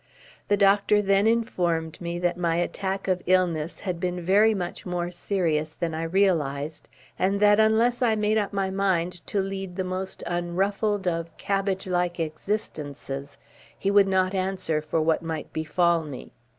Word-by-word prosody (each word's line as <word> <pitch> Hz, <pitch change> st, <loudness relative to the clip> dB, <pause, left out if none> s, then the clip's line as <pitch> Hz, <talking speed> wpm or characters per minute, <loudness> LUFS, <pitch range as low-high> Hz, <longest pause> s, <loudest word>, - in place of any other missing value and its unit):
The 205 Hz, -, +3 dB
doctor 200 Hz, +1 st, +4 dB
then 200 Hz, +1 st, +3 dB
informed 175 Hz, -9 st, 0 dB
me 170 Hz, 0 st, -3 dB
that 175 Hz, 0 st, 0 dB
my 170 Hz, -2 st, 0 dB
attack 190 Hz, +3 st, -2 dB
of 185 Hz, -1 st, +1 dB
illness 175 Hz, -3 st, +1 dB
had 180 Hz, -4 st, -3 dB
been 180 Hz, 0 st, -2 dB
very 205 Hz, +5 st, +4 dB
much 180 Hz, -3 st, -4 dB
more 175 Hz, -1 st, -3 dB
serious 165 Hz, -5 st, -1 dB
than 165 Hz, -1 st, -3 dB
I 160 Hz, -, -3 dB
realised, 160 Hz, -5 st, 0 dB, 0.3 s
and 195 Hz, +2 st, +1 dB
that 205 Hz, 0 st, +5 dB
unless 225 Hz, +3 st, +3 dB
I 230 Hz, -3 st, +3 dB
made 215 Hz, 0 st, +2 dB
up 205 Hz, -, -2 dB
my 195 Hz, -1 st, -1 dB
mind 180 Hz, -3 st, 0 dB
to 205 Hz, -, 0 dB
lead 195 Hz, -1 st, -5 dB
the 190 Hz, -, -1 dB
most 185 Hz, +1 st, -4 dB
unruffled 190 Hz, +4 st, -1 dB
of 165 Hz, -1 st, -2 dB
cabbage 195 Hz, -1 st, -1 dB
like 180 Hz, -1 st, -1 dB
existences, 150 Hz, -5 st, -4 dB, 0.4 s
he 200 Hz, -, 0 dB
would 200 Hz, -1 st, +5 dB
not 190 Hz, 0 st, +2 dB
answer 185 Hz, -4 st, -1 dB
for 155 Hz, +2 st, -1 dB
what 160 Hz, 0 st, +2 dB
might 160 Hz, -2 st, -5 dB
befall 170 Hz, +2 st, +2 dB
me. 145 Hz, -5 st, -8 dB
185 Hz, 165 wpm, -25 LUFS, 165-195 Hz, 0.4 s, that